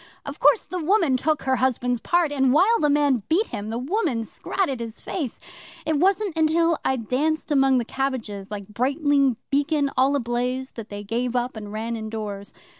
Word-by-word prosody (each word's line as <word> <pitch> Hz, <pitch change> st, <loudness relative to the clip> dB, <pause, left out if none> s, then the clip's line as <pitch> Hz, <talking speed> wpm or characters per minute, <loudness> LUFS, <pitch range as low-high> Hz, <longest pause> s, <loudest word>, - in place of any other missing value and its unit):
Of -, -, -7 dB
course 465 Hz, -, +5 dB
the 365 Hz, -3 st, -4 dB
woman 345 Hz, -6 st, +3 dB
took 305 Hz, +4 st, 0 dB
her 260 Hz, -1 st, +1 dB
husband's 245 Hz, -1 st, 0 dB
part, 345 Hz, +3 st, +1 dB
and 265 Hz, -3 st, +2 dB
while 405 Hz, +10 st, +4 dB
the 295 Hz, -, +2 dB
man 285 Hz, -4 st, +3 dB
beat 375 Hz, +8 st, +2 dB
him, 210 Hz, -2 st, -5 dB
the 225 Hz, -, -3 dB
woman 275 Hz, -, -1 dB
scratted 275 Hz, -, -2 dB
his 230 Hz, -1 st, -6 dB
face. 290 Hz, -11 st, -4 dB, 0.5 s
It 310 Hz, -2 st, +1 dB
wasn't 390 Hz, +2 st, +2 dB
till 330 Hz, +1 st, +2 dB
I 265 Hz, -, +1 dB
danced 290 Hz, +7 st, -1 dB
among 270 Hz, -2 st, +4 dB
the 240 Hz, -, 0 dB
cabbages 230 Hz, -7 st, -3 dB
like 205 Hz, -2 st, -6 dB
Brightling 275 Hz, +3 st, +1 dB
Beacon 285 Hz, 0 st, +1 dB
all 270 Hz, +2 st, +3 dB
ablaze 250 Hz, +1 st, -2 dB
that 230 Hz, -2 st, -9 dB
they 205 Hz, 0 st, -6 dB
gave 235 Hz, +4 st, -2 dB
up 245 Hz, 0 st, -1 dB
and 210 Hz, -2 st, -7 dB
ran 225 Hz, +2 st, -3 dB
indoors. 215 Hz, -2 st, -5 dB
265 Hz, 185 wpm, -24 LUFS, 230-310 Hz, 0.5 s, course